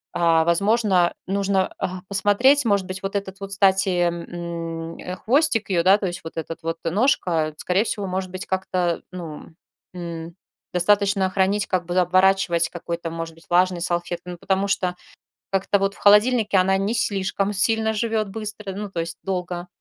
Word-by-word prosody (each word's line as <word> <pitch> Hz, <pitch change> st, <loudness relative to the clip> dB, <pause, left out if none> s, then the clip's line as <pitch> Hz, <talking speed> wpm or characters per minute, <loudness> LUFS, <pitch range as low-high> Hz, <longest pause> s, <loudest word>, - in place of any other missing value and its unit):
а, 165 Hz, -1 st, +3 dB
возможно 190 Hz, 0 st, +2 dB
нужно, 195 Hz, 0 st, 0 dB
а, 185 Hz, 0 st, -3 dB
посмотреть, 205 Hz, +8 st, +3 dB
может 200 Hz, -4 st, +2 dB
быть, 185 Hz, 0 st, -5 dB
вот 195 Hz, +1 st, -4 dB
этот 195 Hz, -1 st, -4 dB
вот, 195 Hz, -, -5 dB
кстати, 195 Hz, 0 st, +3 dB
м, 170 Hz, -1 st, -4 dB, 0.3 s
хвостик 265 Hz, -3 st, +2 dB
её, 175 Hz, -2 st, +3 dB
да, 190 Hz, +3 st, +6 dB
то 205 Hz, -, -4 dB
есть 175 Hz, 0 st, -5 dB
вот 160 Hz, 0 st, -9 dB
этот 165 Hz, +1 st, -5 dB
вот 165 Hz, 0 st, -2 dB
ножка, 170 Hz, -, +1 dB
скорее 185 Hz, +5 st, +1 dB
всего, 205 Hz, -3 st, -2 dB
может 185 Hz, 0 st, -3 dB
быть, 185 Hz, +1 st, -6 dB
как-то, 185 Hz, -2 st, -1 dB
ну, 170 Hz, -4 st, -8 dB, 0.5 s
м, 170 Hz, -1 st, -7 dB, 0.4 s
достаточно 195 Hz, +1 st, +2 dB
хранить, 200 Hz, +2 st, +1 dB
как 180 Hz, -2 st, -1 dB
бы 175 Hz, +1 st, -2 dB
оборачивать 185 Hz, -1 st, +3 dB
какой-то 170 Hz, -1 st, -5 dB
может 165 Hz, 0 st, -5 dB
быть 165 Hz, -, -19 dB
влажной 180 Hz, 0 st, +2 dB
салфеткой. 175 Hz, 0 st, -3 dB
Ну -, -, -9 dB
потому 195 Hz, +2 st, 0 dB
что 180 Hz, -2 st, 0 dB, 0.6 s
как-то 195 Hz, +1 st, +1 dB
вот 195 Hz, 0 st, -1 dB
в -, -, -16 dB
холодильнике 210 Hz, 0 st, +4 dB
она 190 Hz, +1 st, +3 dB
не 200 Hz, +3 st, -1 dB
слишком 200 Hz, -3 st, 0 dB
сильно 220 Hz, +2 st, +3 dB
живёт 220 Hz, -1 st, -1 dB
быстро, 210 Hz, -1 st, -6 dB
ну, 205 Hz, +1 st, -6 dB
то 175 Hz, -, -4 dB
есть 165 Hz, 0 st, -6 dB
долго, 180 Hz, -2 st, -3 dB
190 Hz, 165 wpm, -23 LUFS, 175-200 Hz, 0.6 s, да